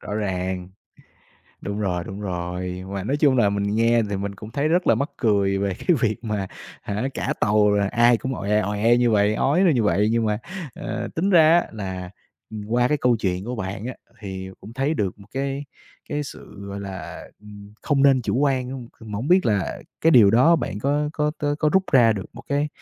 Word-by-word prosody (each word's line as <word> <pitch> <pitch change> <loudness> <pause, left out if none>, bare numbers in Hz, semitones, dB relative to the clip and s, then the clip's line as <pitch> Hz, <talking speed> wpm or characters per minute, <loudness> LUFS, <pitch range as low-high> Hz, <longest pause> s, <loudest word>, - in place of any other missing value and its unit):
Rõ 105 - -6
ràng. 95 -3 -2 0.9
Đúng 100 +1 -4
rồi, 90 -4 -1
đúng 95 +3 -7
rồi, 90 -1 -4
mà 100 -1 -4
nói 135 +7 0
chung 145 -3 +3
là 110 -5 +4
mình 100 0 -1
nghe 115 +1 +3
thì 100 - -1
mình 100 +1 -4
cũng 105 +2 -10
thấy 140 +5 0
rất 175 +3 +1
là - - +5
mắc 140 +3 -2
cười 100 -4 +1
về 100 -1 -1
cái 175 - +1
việc 115 +1 -1
mà 105 -3 -2 0.4
hả, 105 +6 -2
cả - - -1
tàu 105 0 +3
rồi 100 -1 +2
ai 120 +3 +4
cũng 130 +3 -4
oẹ, 105 -1 0
oẹ 105 +4 +2
như 120 -1 +3
vậy, 105 -1 +3
ói 145 - +2
ra 175 - +5
như 120 -5 +1
vậy. 105 0 +2
Nhưng 115 0 +1
mà, 105 -1 0 0.4
ờ, 115 +2 -4
tính 185 +5 0
ra 165 -2 +6
á - - -7
là, 95 -4 -6 0.4
ừm, 110 -1 -6
qua 120 +2 +2
cái 150 - +2
câu 125 -2 +3
chuyện 95 -3 -2
của 120 +3 -4
bạn 100 +2 -5
á 130 - -5 0.3
thì 95 -2 -6
cũng 105 - -11
thấy 135 +5 0
được 100 - -2
một 100 0 -16
cái 135 +2 -3 0.4
cái 150 - -2
sự, 100 -7 -10
gọi 100 0 -6
là, 95 -2 -7 0.2
ừm, 105 -1 -13
không 140 -3 +1
nên 135 -2 +5
chủ 115 - -1
quan 135 -3 +1
hông. 130 -3 -7
C - - -24
mà 105 -2 -6
hổng 120 +8 -3
biết 185 -2 +4
là 100 -4 -1 0.2
cái 165 - +4
điều 115 -9 +7
đó 130 +10 +5
bạn 100 - -4
có 145 +5 0
có 150 -1 0
tó 145 0 0
có 155 - +2
rút 190 0 +3
ra 120 -5 +6
được 100 -3 -5
một - - -11
cái 145 +1 0
110 Hz, 230 wpm, -23 LUFS, 100-135 Hz, 0.9 s, điều